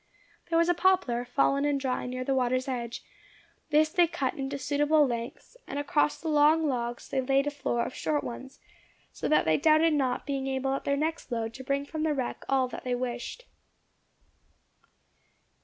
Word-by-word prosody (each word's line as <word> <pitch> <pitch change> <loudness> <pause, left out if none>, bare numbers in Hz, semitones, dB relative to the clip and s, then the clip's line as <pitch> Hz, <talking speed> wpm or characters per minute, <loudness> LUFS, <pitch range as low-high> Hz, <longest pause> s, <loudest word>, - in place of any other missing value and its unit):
There 330 - +2
was 335 0 +4
a 350 - +4
poplar, 360 -10 +2
fallen 275 +3 +1
and 290 -1 +1
dry, 255 -2 -2
near 255 0 -4
the 270 - 0
water's 255 0 +1
edge; 240 -3 -4 0.7
this 310 0 +4
they 345 +1 +3
cut 275 -5 -2
into 270 +1 -4
suitable 295 +2 +3
lengths, 240 - -5
and 280 - -5
across 295 +1 +1
the 330 - -6
long 305 +1 +4
logs 240 -3 -3
they 265 - -1
laid 270 +2 +2
a 290 - -1
floor 240 -4 -1
of - - -6
short 295 -2 -1
ones, 265 +3 -8 0.5
so - - -4
that 305 - +3
they 160 -1 +3
doubted 315 +1 +4
not 260 -4 0
being 275 -2 -2
able 270 0 -1
at 275 - -4
their 280 0 +1
next 315 -2 -3
load 230 -1 -2
to 260 - -9
bring 275 +1 -1
from 310 +2 -5
the 310 -1 +1
wreck 255 -3 -3
all 265 -1 +2
that - - -8
they 250 -1 -1
wished. 245 - -5
275 Hz, 190 wpm, -28 LUFS, 255-300 Hz, 0.7 s, was